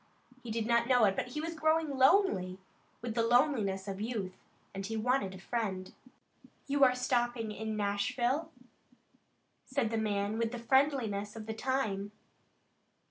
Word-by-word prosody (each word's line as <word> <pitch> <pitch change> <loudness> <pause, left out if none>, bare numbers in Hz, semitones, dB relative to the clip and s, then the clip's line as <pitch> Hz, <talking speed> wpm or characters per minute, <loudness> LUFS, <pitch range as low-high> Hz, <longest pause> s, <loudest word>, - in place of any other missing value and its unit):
He 240 - -9
did 220 0 -1
not 235 0 +2
know 250 -4 +5
it, 195 -1 +2
but - - -2
he 300 +5 -4
was 330 +1 -3
growing 315 -1 +1
lonely, 265 - +3 0.5
with 235 -2 -3
the 230 - +1
loneliness 230 -6 +2
of 195 0 -4
youth, 215 -5 -3 0.4
and 195 0 -5
he 225 +3 -3
wanted 220 -4 0
a - - -8
friend. 190 -2 -3 0.7
"You 280 0 +2
are 255 -1 +6
stopping 240 -3 0
in 220 0 -4
Nashville?" 240 +9 0 1.2
said 260 -4 0
the 225 - 0
man 210 0 -1
with 230 +1 -1
the - - -3
friendliness 235 -5 +1
of 220 -1 -7
the 220 - -4
time. 220 -5 -2
230 Hz, 155 wpm, -32 LUFS, 205-260 Hz, 1.2 s, are